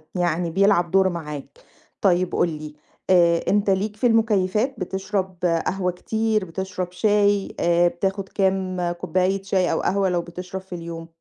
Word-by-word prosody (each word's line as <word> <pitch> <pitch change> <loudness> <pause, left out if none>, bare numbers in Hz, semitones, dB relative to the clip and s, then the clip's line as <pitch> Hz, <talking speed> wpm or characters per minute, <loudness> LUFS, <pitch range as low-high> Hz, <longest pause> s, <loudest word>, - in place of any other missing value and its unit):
يعني 175 -1 0
بيلعب 175 -1 +2
دور 190 -1 +4
معاك. 150 - -7 0.4
طيّب 180 -2 +2
قُل 175 - +2
لي، 155 -1 -7 0.3
آآ 170 -2 +5
أنت 205 0 +2
ليك 200 +2 0
في 245 +4 +2
المُكيّفات؟ 225 +2 +1
بتشرب 190 0 -3
قهوة 180 +2 0
كتير، 220 +3 -1
بتشرب 185 +1 -5
شاي، 205 +1 +2
آآ 175 0 +3
بتاخد 190 +3 -2
كام 190 -2 0
كوباية 185 +3 -1
شاي 190 -2 +1
أو - - 0
قهوة 195 0 +1
لو 175 -1 0
بتشرب 180 +2 -7
في 190 -1 -9
اليوم؟ 165 -1 -7
185 Hz, 150 wpm, -23 LUFS, 175-195 Hz, 0.4 s, آآ